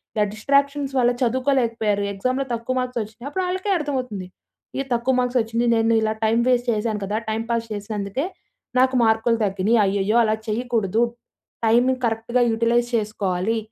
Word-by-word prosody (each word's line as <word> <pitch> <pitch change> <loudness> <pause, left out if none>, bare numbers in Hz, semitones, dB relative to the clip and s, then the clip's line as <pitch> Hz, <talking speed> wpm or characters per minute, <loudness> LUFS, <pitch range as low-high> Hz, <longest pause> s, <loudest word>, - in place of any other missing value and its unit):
ఇల 210 - +3
డిస్ట్రాక్షన్స్ 280 +3 +1
వల్ల 245 0 +4
చదువుకోలేకపోయారు, 230 -5 +1
ఎక్సామ్‌లో 255 +7 -1
తక్కువ 235 +2 -2
మార్క్స్ 250 -1 -2
వచ్చినాయి 220 +5 -8
అప్పుడళ్ళకే 375 +3 -1
అర్థమవుతుంది. 250 - -3 0.5
ఈ - - +2
తక్కువ 240 +2 +1
మార్క్స్ 250 0 +1
వచ్చింది, 230 +2 -1
నేను 225 0 +2
ఇలా 215 0 +1
టైం 225 +1 +3
వేస్ట్ 245 -1 +2
చేశాను 215 -1 -1
కదా, 205 - -3
టైం 220 +1 -1
పాస్ 230 -1 -1
చేసినందుకే 205 - -3 0.5
నాకు 260 0 +3
మార్కులు 225 +1 +2
తగ్గినియి. 200 +4 +1
అయ్యయ్యో! 200 +2 0
అలా 215 0 +2
చేయకూడదు 225 -2 0 0.6
టైమ్‌ 240 +3 +4 0.2
కరెక్ట్‌గా 230 +2 0
యుటిలైజ్ 235 +1 +1
చేసుకోవాలి. 210 -1 -1
230 Hz, 145 wpm, -22 LUFS, 215-255 Hz, 0.6 s, వల్ల